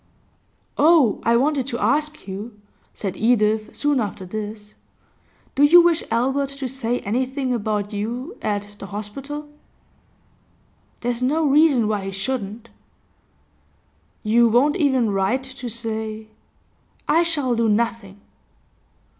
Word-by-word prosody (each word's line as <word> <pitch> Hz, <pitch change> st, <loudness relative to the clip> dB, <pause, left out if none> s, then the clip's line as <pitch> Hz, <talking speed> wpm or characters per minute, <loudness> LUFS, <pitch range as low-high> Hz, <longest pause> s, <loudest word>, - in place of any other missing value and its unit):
'Oh, 300 Hz, -8 st, +5 dB
I 235 Hz, -, +2 dB
wanted 275 Hz, 0 st, +1 dB
to 235 Hz, -, -3 dB
ask 300 Hz, -1 st, 0 dB
you,' 210 Hz, +3 st, -7 dB, 0.3 s
said 195 Hz, -2 st, -5 dB
Edith, 215 Hz, -1 st, +1 dB
soon 290 Hz, -2 st, +1 dB
after 200 Hz, -4 st, -4 dB
this. 210 Hz, +1 st, -7 dB, 0.8 s
'Do 275 Hz, -, -1 dB
you 305 Hz, +5 st, +8 dB
wish 340 Hz, -1 st, +3 dB
Albert 265 Hz, +5 st, +1 dB
to 275 Hz, -1 st, -5 dB
say 245 Hz, -1 st, -2 dB
anything 255 Hz, +4 st, -1 dB
about 210 Hz, -2 st, -2 dB
you 240 Hz, -, -4 dB
at 205 Hz, 0 st, -3 dB
the 195 Hz, -, -7 dB
hospital?' 270 Hz, +10 st, -6 dB, 1.5 s
'There's 245 Hz, 0 st, -2 dB
no 305 Hz, +5 st, +1 dB
reason 285 Hz, -5 st, +4 dB
why 210 Hz, -2 st, -1 dB
he 195 Hz, -, -4 dB
shouldn't.' 215 Hz, +2 st, -4 dB, 1.5 s
'You 230 Hz, +2 st, +4 dB
won't 265 Hz, +7 st, +3 dB
even 265 Hz, -, +2 dB
write 200 Hz, +7 st, 0 dB
to 260 Hz, -2 st, -7 dB
say 220 Hz, -1 st, -4 dB, 0.4 s
?' -, -, -39 dB
'I 330 Hz, -, +4 dB
shall 295 Hz, -7 st, 0 dB
do 230 Hz, -1 st, +1 dB
nothing. 220 Hz, -2 st, -1 dB
235 Hz, 125 wpm, -22 LUFS, 210-275 Hz, 1.5 s, you